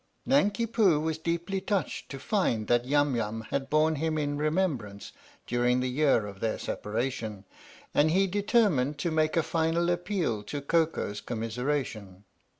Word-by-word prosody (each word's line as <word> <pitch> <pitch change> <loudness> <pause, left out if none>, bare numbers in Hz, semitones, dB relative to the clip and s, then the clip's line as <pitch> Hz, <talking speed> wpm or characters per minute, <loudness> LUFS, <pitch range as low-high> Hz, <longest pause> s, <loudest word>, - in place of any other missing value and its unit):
Nanki 230 -4 +2
Poo 210 -9 +3
was 160 0 -2
deeply 170 +4 -2
touched 195 -6 -2
to 135 - -6
find 135 - 0
that 120 +2 +2
Yum 145 0 +2
Yum 110 -1 -2
had 135 -1 -2
borne 155 +1 +3
him 160 +1 -1
in 145 -1 -1
remembrance 145 - -1 0.3
during 125 +1 +1
the 130 - 0
year 135 -4 +2
of 100 -1 -9
their 110 0 -1
separation, 110 -2 -3 0.5
and 150 +2 +4
he 190 +4 +3
determined 195 - +2
to 170 +2 -1
make 155 +1 +1
a 165 - +3
final 165 +2 +1
appeal 175 - -1
to 145 +7 -5
Koko's 155 -8 0
commiseration. 115 -4 -3
150 Hz, 150 wpm, -28 LUFS, 120-170 Hz, 0.5 s, and